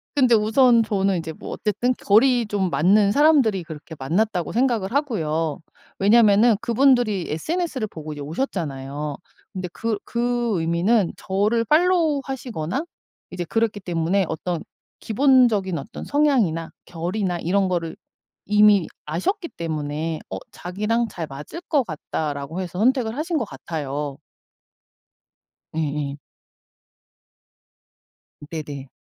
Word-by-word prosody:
근데 255 Hz, -4 st, +5 dB
우선 230 Hz, +2 st, +4 dB
저는 195 Hz, -3 st, +1 dB
이제 160 Hz, 0 st, -5 dB
뭐 -, -, -10 dB
어쨌든 220 Hz, +4 st, 0 dB
결이 240 Hz, +3 st, +4 dB
좀 200 Hz, -3 st, 0 dB
맞는 195 Hz, +8 st, +4 dB
사람들이 270 Hz, -, +4 dB
그렇게 160 Hz, -1 st, -9 dB
만났다고 175 Hz, +6 st, 0 dB
생각을 235 Hz, -5 st, +1 dB
하고요. 165 Hz, -, -1 dB, 0.4 s
왜냐하면은 215 Hz, +2 st, +5 dB
그분들이 235 Hz, -5 st, +3 dB
SNS를 280 Hz, -, -2 dB
보고 155 Hz, -5 st, -8 dB
이제 145 Hz, -, -8 dB
오셨잖아요. 145 Hz, -, -4 dB, 0.4 s
근데 185 Hz, -1 st, -4 dB
그 225 Hz, -2 st, -2 dB
그 240 Hz, -4 st, 0 dB
의미는 170 Hz, +5 st, +2 dB
저를 210 Hz, +5 st, +1 dB
팔로우하시거나 280 Hz, -, +1 dB, 0.5 s
이제 180 Hz, -1 st, -3 dB
그랬기 225 Hz, +2 st, 0 dB
때문에 180 Hz, +1 st, 0 dB
어떤 170 Hz, +1 st, -3 dB, 0.4 s
기본적인 225 Hz, -7 st, +3 dB
어떤 140 Hz, -, -8 dB
성향이나 240 Hz, -, +1 dB
결이나 175 Hz, +2 st, -2 dB
이런 190 Hz, +4 st, +1 dB
거를 170 Hz, -3 st, -2 dB, 0.5 s
이미 210 Hz, -3 st, +5 dB, 0.2 s
아셨기 335 Hz, -, -2 dB
때문에 155 Hz, 0 st, -3 dB
어 95 Hz, -, -4 dB
'자기랑 210 Hz, +6 st, -1 dB
잘 170 Hz, -5 st, -5 dB
맞을 145 Hz, -, -8 dB
것 290 Hz, -4 st, +3 dB
같다.'라고 155 Hz, -1 st, -4 dB
해서 180 Hz, 0 st, -5 dB
선택을 240 Hz, -1 st, +2 dB
하신 325 Hz, +2 st, -1 dB
것 245 Hz, -, -1 dB
같아요. 145 Hz, -2 st, -5 dB, 1.6 s
예예. 145 Hz, -2 st, -2 dB, 2.3 s
네네. 145 Hz, -4 st, -6 dB
195 Hz, 275 characters per minute, -23 LUFS, 160-235 Hz, 2.3 s, 근데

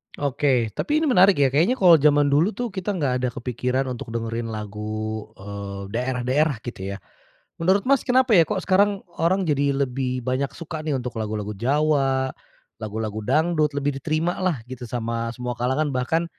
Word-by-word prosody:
Oke, 135 Hz, -4 st, +1 dB
tapi 305 Hz, +1 st, +1 dB
ini -, -, +1 dB
menarik 190 Hz, -4 st, +6 dB
ya. 135 Hz, -, +5 dB
Kayaknya 165 Hz, -, +3 dB
kalo 175 Hz, -3 st, +8 dB
jaman 145 Hz, 0 st, +4 dB
dulu 165 Hz, +10 st, +3 dB
tuh, 245 Hz, -1 st, -3 dB
kita 195 Hz, +1 st, -3 dB
nggak 145 Hz, -7 st, 0 dB
ada -, -, +2 dB
kepikiran 125 Hz, +1 st, -2 dB
untuk 115 Hz, -2 st, -7 dB
dengerin 115 Hz, 0 st, -3 dB
lagu, 110 Hz, +1 st, -4 dB
eee, 100 Hz, 0 st, -7 dB
daerah-daerah 130 Hz, +5 st, 0 dB
gitu 100 Hz, -5 st, -5 dB
ya. -, -, -6 dB, 0.6 s
Menurut 190 Hz, +4 st, +3 dB
Mas, 275 Hz, 0 st, +3 dB
kenapa 255 Hz, 0 st, +3 dB
ya, 180 Hz, -, +8 dB
kok -, -, -1 dB
sekarang 200 Hz, +1 st, +2 dB, 0.2 s
orang 185 Hz, +3 st, +2 dB
jadi 140 Hz, -3 st, +1 dB
lebih 125 Hz, -1 st, -3 dB
banyak 130 Hz, +2 st, 0 dB
suka 160 Hz, -1 st, -6 dB
nih, 155 Hz, -3 st, -1 dB
untuk 125 Hz, -1 st, -5 dB
lagu-lagu 105 Hz, -1 st, -3 dB
Jawa, 135 Hz, +2 st, +1 dB, 0.5 s
lagu-lagu 110 Hz, 0 st, -4 dB
dangdut, 155 Hz, +4 st, +1 dB
lebih 140 Hz, -1 st, -1 dB
diterima 160 Hz, +4 st, -1 dB
lah 185 Hz, -5 st, +1 dB
gitu, 125 Hz, -1 st, -8 dB
sama 115 Hz, -1 st, -2 dB
semua 125 Hz, 0 st, -3 dB
kalangan, 130 Hz, +5 st, -1 dB
bahkan 145 Hz, +7 st, 0 dB
135 Hz, 170 wpm, -23 LUFS, 115-160 Hz, 0.6 s, kalo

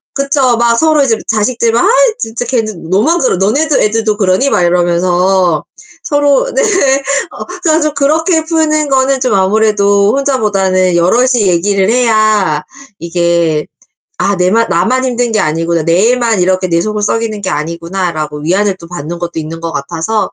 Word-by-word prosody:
그쵸. 275 Hz, -3 st, +1 dB
막 235 Hz, 0 st, +2 dB
서로 310 Hz, -1 st, +3 dB
이제 225 Hz, -4 st, +1 dB
자식들 230 Hz, +2 st, 0 dB
막 235 Hz, -, +2 dB
"아 -, -, +3 dB, 0.3 s
진짜 235 Hz, -, -4 dB
걔는." 215 Hz, -9 st, -3 dB
너만 270 Hz, -, +2 dB
그러 255 Hz, -, +1 dB
"너네들 275 Hz, -, +1 dB
애들도 215 Hz, 0 st, 0 dB
그러니?" 195 Hz, +7 st, +1 dB
막 180 Hz, -, +2 dB
이러면서 175 Hz, 0 st, +1 dB, 0.4 s
서로 290 Hz, -, +1 dB
네. -, -, +1 dB, 0.7 s
어 -, -, -8 dB, 0.2 s
전 320 Hz, -1 st, +2 dB
좀 305 Hz, -1 st, -1 dB
그렇게 320 Hz, +3 st, +1 dB
푸는 310 Hz, -2 st, 0 dB
거는 265 Hz, 0 st, +1 dB
좀 250 Hz, -5 st, 0 dB
아무래도 200 Hz, 0 st, +2 dB
혼자보다는 195 Hz, -9 st, 0 dB
여럿이 235 Hz, +7 st, +2 dB
얘기를 190 Hz, +3 st, +1 dB
해야 215 Hz, -9 st, +1 dB, 0.4 s
이게 170 Hz, -2 st, -1 dB, 0.5 s
'아 200 Hz, -, +1 dB
내만 190 Hz, +6 st, +1 dB
나만 250 Hz, +10 st, +1 dB
힘든 245 Hz, -2 st, -1 dB
게 215 Hz, -, +1 dB
아니구나. 165 Hz, +1 st, -1 dB
내 185 Hz, +9 st, +2 dB
애만 235 Hz, -5 st, 0 dB
이렇게 185 Hz, 0 st, 0 dB
내 170 Hz, -1 st, 0 dB
속을 210 Hz, +1 st, -3 dB
썩이는 220 Hz, -1 st, -2 dB
게 190 Hz, -, -3 dB
아니구나.'라고 165 Hz, -1 st, -4 dB
위안을 190 Hz, +4 st, 0 dB
또 170 Hz, -, -12 dB
받는 170 Hz, 0 st, -7 dB
것도 175 Hz, 0 st, -5 dB
있는 160 Hz, +1 st, -7 dB
것 165 Hz, -1 st, -4 dB
같아서 170 Hz, +9 st, -3 dB
205 Hz, 330 characters per minute, -12 LUFS, 175-250 Hz, 0.7 s, 서로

